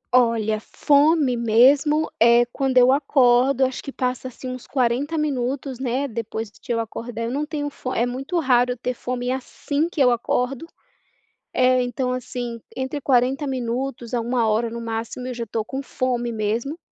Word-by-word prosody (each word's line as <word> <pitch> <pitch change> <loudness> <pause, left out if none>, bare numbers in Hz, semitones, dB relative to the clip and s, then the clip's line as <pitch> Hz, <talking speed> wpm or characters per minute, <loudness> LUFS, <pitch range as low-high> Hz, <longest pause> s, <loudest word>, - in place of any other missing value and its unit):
Olha, 225 -3 +3
fome 285 +1 +3
mesmo 270 +7 +4
é 235 +1 +6
quando 265 -2 0
eu 250 +1 +7
acordo. 270 -2 +3
Eu 265 - +6
acho 260 - -6
que 275 - -6
passa, 255 0 -2
assim, 255 +1 -9
uns 255 -1 -7
40 265 +5 0
minutos, 265 -2 -2
né, 265 +2 -1
depois 225 -2 -5
de 240 - -9
eu 230 - +1
acordar, 230 +1 -5
eu 230 - -2
não 295 +3 -2
tenho 295 -2 -3
fo 255 - -6
eh, 235 - +2
é - - +2
muito 270 +8 -2
raro 250 -4 +3
eu - - -12
ter 250 +1 -2
fome 245 0 -3
assim 285 +4 -2
que 335 - -7
eu 250 -2 +5
acordo. 250 +5 -1 0.8
Eh, 255 0 +3
então, 250 +1 -2
assim, 245 -2 -5 0.2
entre 265 +2 -3
40 265 +3 +2
minutos 250 -1 -3
a 235 - +1
1 235 -1 0
hora, 220 +2 +1
no 235 +1 -6
máximo, 230 +2 -4
eu 255 - -3
já 235 -1 -4
estou 220 0 -3
com 270 +3 -4
fome 250 -3 -2
mesmo. 225 +8 -2
250 Hz, 185 wpm, -22 LUFS, 235-270 Hz, 0.8 s, eu